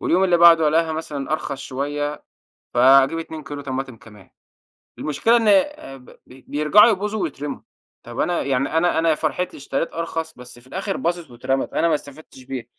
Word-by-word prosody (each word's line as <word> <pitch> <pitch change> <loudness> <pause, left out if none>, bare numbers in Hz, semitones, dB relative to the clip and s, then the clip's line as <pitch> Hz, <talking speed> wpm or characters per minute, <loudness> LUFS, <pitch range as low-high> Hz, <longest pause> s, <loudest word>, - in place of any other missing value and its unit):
واليوم 185 +3 +2
اللي 180 -2 +3
بعده 165 -2 +6
ألاقيها 160 +1 +1
مثلًا 150 -3 -5
أرخص 140 -3 -3
شويّة 145 +2 -4 0.5
فاجيب 135 +5 +5
2 160 -1 -8
كيلو 145 -1 -7
طماطم 135 -2 -5
كمان. 105 -4 -17 0.7
المشكلة 225 +11 +2
إن 225 -2 0
آآ 205 - +1
ب 125 - -18
بي 130 0 -17
بيرجعوا 150 +10 +5
يبوظوا 210 0 -2
ويترَموا. 145 -3 -5 0.4
طب 120 +1 -9
أنا 175 +2 0
يعني 135 +3 -1
أنا 165 0 +2
أنا 165 0 +2
يا 155 - +3
فرحتي 165 +4 -3
اشتريت 145 +3 -3
أرخص 165 -1 -4
بس 125 -1 -13
في 120 - -21
الآخر 190 +7 -4
باظت 170 -4 -3
واترَمَت. 130 +3 -2
أنا 170 - +2
ما 165 - +2
استفدتش 145 -2 -11
بيها، 130 -1 -6
150 Hz, 180 wpm, -21 LUFS, 135-170 Hz, 0.7 s, بعده